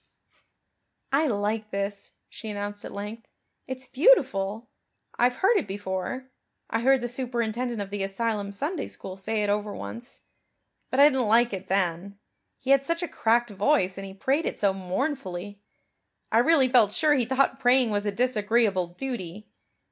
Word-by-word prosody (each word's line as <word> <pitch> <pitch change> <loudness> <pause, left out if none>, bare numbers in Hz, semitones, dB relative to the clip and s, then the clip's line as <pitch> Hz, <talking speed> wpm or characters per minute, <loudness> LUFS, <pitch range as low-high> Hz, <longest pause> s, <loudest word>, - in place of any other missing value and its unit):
"I 295 +3 +3
like 210 -1 -1
this," 200 0 -4
she 220 - -9
announced 205 0 -5
at - - -7
length. 210 +3 -7 0.4
"It's 260 0 -6
beautiful. 250 - +2 0.5
I've 245 +1 +3
heard 400 - +3
it - - -1
before 200 +6 -4 0.4
I 225 - +1
heard 265 +2 +3
the 240 - -2
superintendent 240 -1 -2
of 200 -1 -5
the 205 -1 -3
asylum 200 +1 -2
Sunday 290 - -3
school 185 - -8
say 210 +2 -2
it 205 - 0
over 210 0 -1
once. 240 +3 -8 0.7
But 255 - -1
I 290 - +10
didn't 260 -5 +1
like 235 +1 +4
it 190 0 -5
then. 190 +1 -1 0.4
He 265 - -2
had 275 0 +5
such 335 +4 -2
a - - -1
cracked 235 -2 +1
voice 200 -2 +2
and 195 - -6
he 190 - -10
prayed 275 +10 0
it - - -4
so 200 -2 +2
mournfully. 195 - -4 0.7
I 225 - +4
really 275 +1 +4
felt 235 -5 +4
sure 310 -2 +3
he 255 -4 +2
thought 265 +2 +1
praying 250 -2 +4
was 205 0 -1
a - - +1
disagreeable 215 -4 +1
duty. 210 -1 -6
225 Hz, 165 wpm, -26 LUFS, 200-260 Hz, 0.7 s, I